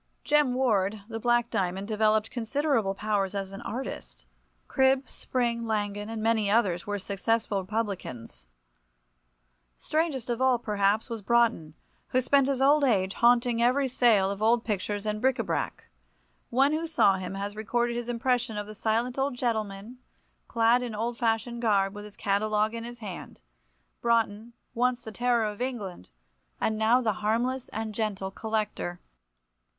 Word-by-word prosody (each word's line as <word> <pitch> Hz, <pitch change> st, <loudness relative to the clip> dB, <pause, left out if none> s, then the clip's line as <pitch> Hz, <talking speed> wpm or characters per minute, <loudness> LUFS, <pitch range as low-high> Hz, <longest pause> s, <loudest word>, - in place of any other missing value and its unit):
Jem 295 Hz, -4 st, +3 dB
Ward, 210 Hz, -5 st, +1 dB
the 225 Hz, 0 st, -4 dB
Black 240 Hz, +1 st, +2 dB
Diamond, 190 Hz, +1 st, -1 dB
developed 215 Hz, 0 st, +2 dB
considerable 240 Hz, -4 st, 0 dB
powers 205 Hz, -1 st, -1 dB
as 195 Hz, -1 st, -3 dB
an 195 Hz, -, -8 dB
artist. 255 Hz, +4 st, -6 dB, 0.4 s
Cribb, 265 Hz, 0 st, +2 dB
Spring, 235 Hz, -2 st, -2 dB
Langan, 205 Hz, -1 st, -2 dB
and 225 Hz, -1 st, -4 dB
many 220 Hz, -2 st, +2 dB
others, 200 Hz, -5 st, +1 dB
were 205 Hz, 0 st, -1 dB
successful 200 Hz, +1 st, -1 dB
publicans. 180 Hz, -, -5 dB, 1.3 s
Strangest 305 Hz, -6 st, -1 dB
of 240 Hz, +1 st, -2 dB
all, 260 Hz, -1 st, +4 dB
perhaps, 210 Hz, -1 st, +1 dB
was 230 Hz, -3 st, -5 dB
Broughton, 230 Hz, -9 st, +1 dB, 0.3 s
who 255 Hz, -, +1 dB
spent 270 Hz, +1 st, +3 dB
his 270 Hz, -1 st, +1 dB
old 290 Hz, +2 st, +5 dB
age 195 Hz, -7 st, +2 dB
haunting 240 Hz, 0 st, +3 dB
every 260 Hz, +3 st, +3 dB
sale 225 Hz, -6 st, +3 dB
of 200 Hz, +1 st, -6 dB
old 230 Hz, +2 st, +3 dB
pictures 205 Hz, -1 st, -2 dB
and 210 Hz, 0 st, -2 dB
bric 265 Hz, 0 st, +2 dB
a -, -, -1 dB
brac. -, -, -3 dB, 0.7 s
One 270 Hz, +4 st, +3 dB
who 320 Hz, +2 st, -1 dB
saw 200 Hz, -11 st, +3 dB
him 185 Hz, +1 st, -5 dB
has 200 Hz, +1 st, -4 dB
recorded 235 Hz, +2 st, -1 dB
his 240 Hz, 0 st, -4 dB
impression 240 Hz, -1 st, 0 dB
of 205 Hz, -, -3 dB
the 215 Hz, -, -9 dB
silent 230 Hz, +5 st, -1 dB
old 270 Hz, -1 st, 0 dB
gentleman, 220 Hz, -1 st, -3 dB, 0.5 s
clad 230 Hz, +1 st, +3 dB
in 240 Hz, -3 st, -4 dB
old 230 Hz, +3 st, -2 dB
fashioned 235 Hz, +1 st, -1 dB
garb, 200 Hz, -4 st, +2 dB
with 205 Hz, 0 st, -8 dB
his 210 Hz, -, -13 dB
catalogue 215 Hz, +2 st, +1 dB
in 230 Hz, 0 st, -5 dB
his 240 Hz, 0 st, -8 dB
hand—Broughton, 205 Hz, -, -4 dB, 0.2 s
once 245 Hz, +1 st, +1 dB
the 225 Hz, -2 st, -9 dB
terror 240 Hz, +1 st, +1 dB
of 210 Hz, +1 st, -5 dB
England, 205 Hz, -, -4 dB, 0.5 s
and 220 Hz, -, 0 dB
now 220 Hz, +4 st, +3 dB
the 220 Hz, -4 st, +1 dB
harmless 240 Hz, +4 st, 0 dB
and 220 Hz, 0 st, -4 dB
gentle 200 Hz, -3 st, -2 dB
collector. 210 Hz, -5 st, -3 dB
225 Hz, 155 wpm, -28 LUFS, 205-245 Hz, 1.3 s, old